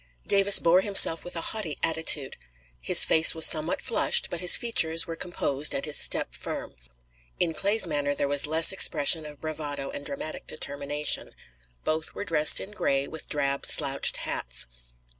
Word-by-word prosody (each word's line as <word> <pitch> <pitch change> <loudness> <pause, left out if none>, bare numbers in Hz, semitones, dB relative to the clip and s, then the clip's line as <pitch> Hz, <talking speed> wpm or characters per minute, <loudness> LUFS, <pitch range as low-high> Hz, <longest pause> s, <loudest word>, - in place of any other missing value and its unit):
Davis 200 0 +5
bore 175 +2 +2
himself 195 -5 +5
with 175 - -8
a 165 - -4
haughty 195 -9 -5
attitude. 160 -3 0 0.5
His - - +6
face 160 0 +3
was 160 - +5
somewhat 155 +2 +1
flushed, 235 - +2
but 175 - -5
his 180 -1 +5
features 165 -9 +1
were 165 - -8
composed 150 -4 -3
and - - -3
his 150 - -1
step - - +2
firm. - - -8 0.7
In 165 -2 -1
Clay's 200 +7 0
manner 145 -1 -3
there 140 - -2
was 145 0 0
less 160 +1 +3
expression 160 -4 +2
of 150 -1 -12
bravado 150 -3 -7
and 285 - -9
dramatic 275 - -8
determination. 145 +1 -3 0.5
Both 160 +1 -4
were - - -7
dressed 155 -4 +3
in 200 - -9
gray, 140 -9 -2
with 160 - -11
drab 140 -1 -3
slouched 135 0 +1
hats. - - -4
160 Hz, 165 wpm, -24 LUFS, 145-175 Hz, 0.7 s, His